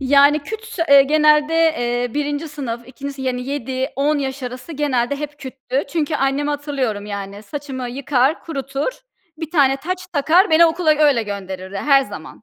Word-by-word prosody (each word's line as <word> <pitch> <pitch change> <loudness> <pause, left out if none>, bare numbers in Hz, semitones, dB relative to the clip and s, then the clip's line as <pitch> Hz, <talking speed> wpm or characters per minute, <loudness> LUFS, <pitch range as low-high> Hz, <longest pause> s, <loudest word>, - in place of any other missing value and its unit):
Yani, 285 +2 +5
küts 440 +2 -8
eee, 280 -1 +8
genelde, 300 +1 +3
eee, 245 -7 +1
1. 295 +2 -2
sınıf, 245 -5 -6
2. 280 +2 -7
sınıf, 265 -1 -6
yani, 250 0 -2
7-10 275 +2 -1
yaş 270 -1 -4
arası 250 +6 -7
genelde 280 -3 0
hep 295 0 -7
küttü. 265 0 -4
Çünkü 315 -1 -1
annemi 280 +1 0
hatırlıyorum, 275 -8 -2
yani, 200 0 -6
saçımı 270 -2 -6
yıkar, 270 +2 +1
kurutur, 275 - -3 0.5
bir 320 -1 -6
tane 275 -5 +3
taç 360 +6 -5
takar, 335 +7 +3
beni 330 +1 +7
okula 325 0 +1
öyle 295 -5 +4
gönderirdi 190 -2 -6
her 275 +4 +4
zaman. 205 -4 -10
280 Hz, 160 wpm, -20 LUFS, 250-300 Hz, 0.5 s, eee